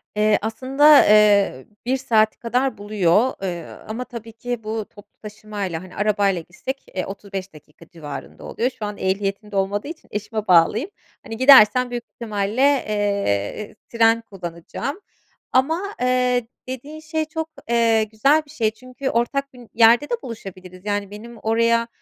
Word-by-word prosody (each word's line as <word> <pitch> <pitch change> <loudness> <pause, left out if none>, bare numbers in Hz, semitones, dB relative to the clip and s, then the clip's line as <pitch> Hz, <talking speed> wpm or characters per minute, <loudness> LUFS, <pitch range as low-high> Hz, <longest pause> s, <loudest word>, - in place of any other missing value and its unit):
Eee, 210 0 +3
aslında, 255 +7 0 0.2
ııı, 205 -10 +4 0.2
1 260 +2 +1
saati 220 -4 +2
kadar 250 +3 -1
buluyor, 205 +3 +2
ııı, 175 -3 -6
ama 225 +3 -4
tabii 230 -2 -9
ki 245 0 -5
bu 215 0 -3
toplu 205 - -18
taşımayla. 205 -5 -5
Hani, 185 - -13
arabayla 205 -3 +1
gitsek, 260 +11 -7
eee, 185 - -1
35 195 -1 -7
dakika 155 +2 -17
civarında 150 -4 -9
oluyor. 245 +3 -1
Şu 215 - -3
an 205 0 -5
ehliyetim 195 +2 -2
de 200 - -7
olmadığı 200 +5 -1
için 325 0 -9
eşime 210 0 -4
bağlıyım. 185 - +4 0.3
Hani, 225 - -7
gidersem 250 -2 +7
büyük 240 -1 -4
ihtimalle, 215 +1 -2
eee, 205 - 0
tren 230 0 +3
kullanacağım. 195 - -6 0.5
Ama, 320 +9 +2 0.2
ııı, 250 0 +2 0.3
dediğin 280 +5 -7
şey 315 0 -3
çok, 320 +1 -5 0.2
eee, 230 -2 +3
güzel 225 +9 +2
bir 285 - -16
şey. 225 -8 0
Çünkü 255 +3 -6
ortak 275 +4 -1
bir 245 -2 -14
yerde 235 +5 +5
de - - -2
buluşabiliriz, 185 -5 -9
yani, 205 -1 -2
benim 230 +3 -10
oraya, 230 +1 +1
220 Hz, 150 wpm, -22 LUFS, 200-250 Hz, 0.5 s, gidersem